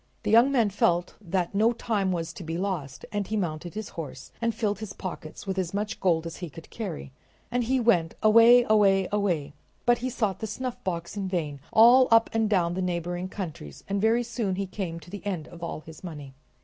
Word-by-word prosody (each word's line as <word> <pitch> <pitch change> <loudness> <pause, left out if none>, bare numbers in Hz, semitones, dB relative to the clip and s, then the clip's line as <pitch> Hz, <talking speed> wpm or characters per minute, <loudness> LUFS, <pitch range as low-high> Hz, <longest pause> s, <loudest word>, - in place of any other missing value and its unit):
The 210 - 0
young 235 +5 +6
man 230 -6 +2
felt 175 -3 +1
that 180 -2 -1
no 220 +4 +3
time 210 -5 -1
was 170 -1 -3
to 180 - -9
be 165 +1 -3
lost, 175 -9 -3
and 205 -2 -2
he 215 - -1
mounted 175 -1 -3
his 215 0 -5
horse 145 -5 -8
and 230 0 +2
filled 205 -3 -1
his 215 -3 -6
pockets 175 -4 -7
with 190 -1 -2
as 185 0 -2
much 210 +1 -2
gold 170 -3 +2
as 165 - -6
he 175 -2 -6
could 160 +3 -13
carry. 185 - -5 0.4
On 245 +1 +1
he 255 +3 +1
went, 180 -9 +2
away, 230 +3 +7
away, 195 -3 +4
away, 190 -8 0 0.3
but 240 0 +4
he 255 +2 -2
sought 220 -6 -1
the 220 - -3
snuffbox 200 -7 -4
in 195 -2 -2
vain 155 -6 -2
all 245 +3 +7
up 230 0 +5
and 225 -1 +1
down 175 -4 +2
the 185 - -2
neighboring 175 0 -2
countries, 160 - -7
and 200 0 -1
very 225 +3 +3
soon 230 -5 -2
he 195 +1 -2
came 185 -3 -5
to 170 +2 -15
the 205 - -7
end 185 -7 -3
of 170 -1 -12
all 170 -2 -4
his 160 +2 -13
money. 150 -6 -8
195 Hz, 215 wpm, -27 LUFS, 170-220 Hz, 0.4 s, away